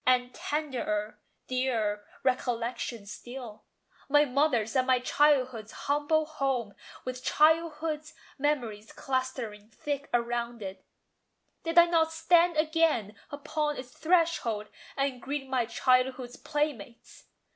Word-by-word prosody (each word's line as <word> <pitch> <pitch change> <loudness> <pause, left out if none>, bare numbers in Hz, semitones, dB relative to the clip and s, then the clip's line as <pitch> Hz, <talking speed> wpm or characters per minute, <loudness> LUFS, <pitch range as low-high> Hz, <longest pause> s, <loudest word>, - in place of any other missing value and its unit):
And 250 -1 +2
tenderer, 235 -8 -2 0.3
dearer 225 -5 -1 0.2
recollection 240 -3 -1
still 240 +1 -9 0.4
My 295 +1 +5
mother's 255 -4 +1
and 255 -1 +2
my 255 -1 +5
childhood's 255 -4 +2
humble 295 +2 +2
home, 270 -8 -2 0.3
With 255 0 -5
childhood's 310 -1 +2 0.2
memories 240 -7 -1
clustering 260 -7 -3
thick 280 +5 -4
around 235 -1 -1
it: 190 0 -7 0.8
Did 330 +1 -3
I 345 - +10
not 325 -2 +2
stand 340 +1 +3
again 310 -9 +2
upon 295 +1 -2
its 250 -1 -8
threshold, 320 -12 +1 0.3
And 275 -2 -1
greet 275 0 -4
my 255 -3 0
childhood's 255 0 +1
playmates? 290 -5 -4
260 Hz, 110 wpm, -29 LUFS, 235-300 Hz, 0.8 s, I